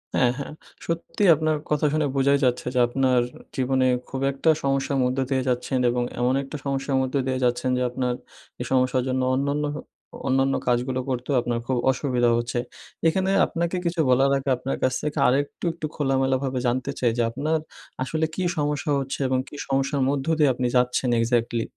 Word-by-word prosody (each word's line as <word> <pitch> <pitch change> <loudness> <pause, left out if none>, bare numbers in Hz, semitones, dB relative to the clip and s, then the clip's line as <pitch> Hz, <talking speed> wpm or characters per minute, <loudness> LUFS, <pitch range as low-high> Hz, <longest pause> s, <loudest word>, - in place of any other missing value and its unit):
হ্যাঁ, 125 -1 +4
হ্যাঁ! 140 - -6 0.3
সত্যি 170 +4 -2
আপনার 155 0 0
কথা 150 0 +1
শুনে 155 -1 +1
বোঝাই 140 +1 +3
যাচ্ছে 125 0 0
যে, - - +3
আপনার 130 0 +2 0.4
জীবনে 130 0 +1 0.2
খুব 135 0 -4
একটা 135 +4 0
সমস্যার 135 0 0
মধ্য 125 +1 0
দিয়ে 135 -1 +1
যাচ্ছেন 125 +1 0
এবং 120 0 0 0.2
এমন 125 +1 +2
একটা 140 +2 -7
সমস্যার 135 0 -1
মধ্য 130 +1 -3
দিয়ে 130 0 0
যাচ্ছেন 120 +1 0
যে 125 - -1
আপনার 125 0 -1 0.5
এই - - -3
সমস্যার 130 -1 +2
জন্য 130 0 0
অন্যান্য 140 +3 0 0.6
অন্যান্য 135 +1 +2
কাজগুলো 125 +1 +1
করতেও 130 +2 -1
আপনার 120 -1 -2
খুব 130 - 0
অসুবিধা 125 -2 +1
হচ্ছে। 120 +1 -2 0.5
এখানে 190 +3 +1 0.2
আপনাকে 170 +2 -2
কিছু 170 0 -1
বলার 135 +2 +4
আগে 135 0 -3
আপনার 130 +2 -3
কাছ 130 - +2
থেকে 150 0 -3
আরেকটু 140 +7 0
একটু 165 -2 -6
খোলামেলাভাবে 135 -2 0
জানতে 130 +3 -1
চাই 120 -2 +2
যে, - - +2
আপনার 150 +6 0 0.5
আসলে 160 +4 -1
কী 185 - -2
সমস্যা 150 +1 -1
হচ্ছে 135 0 -4
এবং 130 0 +1
কী - - -11
সমস্যার 135 +1 0
মধ্য 140 -1 -1
দিয়ে 150 -2 +5
আপনি 125 0 -1
যাচ্ছেন 125 0 +1
exactly? 115 0 +1
135 Hz, 175 wpm, -24 LUFS, 125-140 Hz, 0.6 s, দিয়ে